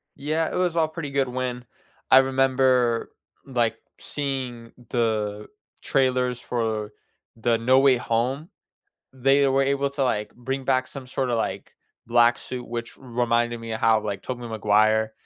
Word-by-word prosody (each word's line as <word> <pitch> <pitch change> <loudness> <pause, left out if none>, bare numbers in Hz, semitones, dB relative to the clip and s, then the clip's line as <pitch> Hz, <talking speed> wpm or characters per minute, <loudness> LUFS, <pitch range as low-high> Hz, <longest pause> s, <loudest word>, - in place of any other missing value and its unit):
Yeah, 155 +3 -1
it - - -4
was 180 -2 0
all 160 -2 +3
pretty 155 -2 -6
good 135 -1 +1
when 125 -1 -4 0.5
I 130 - +10
remember, 130 -2 +2 0.3
like, 120 -4 0 0.2
seeing 130 -5 -4 0.2
the 105 -3 -1 0.3
trailers 125 -2 +1
for 110 -4 -2 0.4
the 115 0 +1
No 130 +3 +4
Way 135 -2 +5
Home. 125 +7 -1 0.6
They 135 +2 +3
were 135 +1 +3
able 140 0 0
to, 140 -1 -1
like, 105 -4 -1
bring 135 +2 -4
back 130 -1 +1
some 135 -1 -9
sorta, 125 -1 -1
like, 115 - -3 0.3
black 120 0 +4
suit, 125 -1 -7
which 120 0 -6
reminded 120 -2 -1
me 115 0 -6
of 110 - -4
how, 110 -1 +4
like, 105 -2 -4
Tobey 125 -2 -5
Maguire 110 0 +2
125 Hz, 150 wpm, -24 LUFS, 115-135 Hz, 0.6 s, I